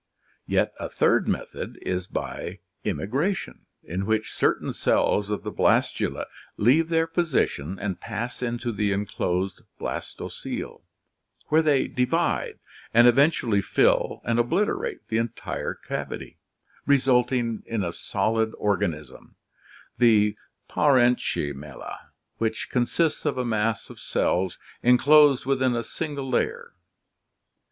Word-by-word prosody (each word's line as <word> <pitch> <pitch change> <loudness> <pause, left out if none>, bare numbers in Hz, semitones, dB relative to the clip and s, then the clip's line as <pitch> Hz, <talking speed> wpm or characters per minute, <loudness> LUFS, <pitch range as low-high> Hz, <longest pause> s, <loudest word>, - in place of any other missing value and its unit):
Yet - - +1
a - - -4
third - - +2
method - - -3
is 90 0 -2
by - - -5 0.3
immigration, 150 - -2 0.2
in 95 +4 -4
which 110 0 0
certain - - 0
cells 100 0 +1
of 105 - -2
the - - -4
blastula - - +1 0.3
leave 145 +10 +4
their 165 -1 +2
position 155 - 0
and 100 -2 -3
pass 115 +5 -4
into 120 0 -2
the 105 -1 0
enclosed 95 -2 -2 0.2
blastocoele, - - -5 0.7
where 155 +1 +5
they 150 -4 +2
divide 125 0 0 0.4
and 120 +1 +8
eventually 120 -5 +3
fill - - +2
and 115 +1 +1
obliterate 210 - 0
the 110 - +1
entire 115 -1 -3
cavity, - - -6 0.5
resulting 125 -4 +2
in 115 -3 -1
a 85 - -2
solid 110 +4 0
organism, 75 -9 -2 0.6
the 105 -3 +4 0.3
parenchymella, 120 - 0 0.3
which 110 -1 -2
consists 140 +6 +1
of - - -1
a 125 - -1
mass 110 -1 -1
of - - -13
cells 90 0 0 0.2
enclosed 140 +2 +5
within 130 -2 +1
a 115 - -1
single 145 +1 -4
layer. 475 - -1
120 Hz, 115 wpm, -25 LUFS, 105-140 Hz, 0.7 s, and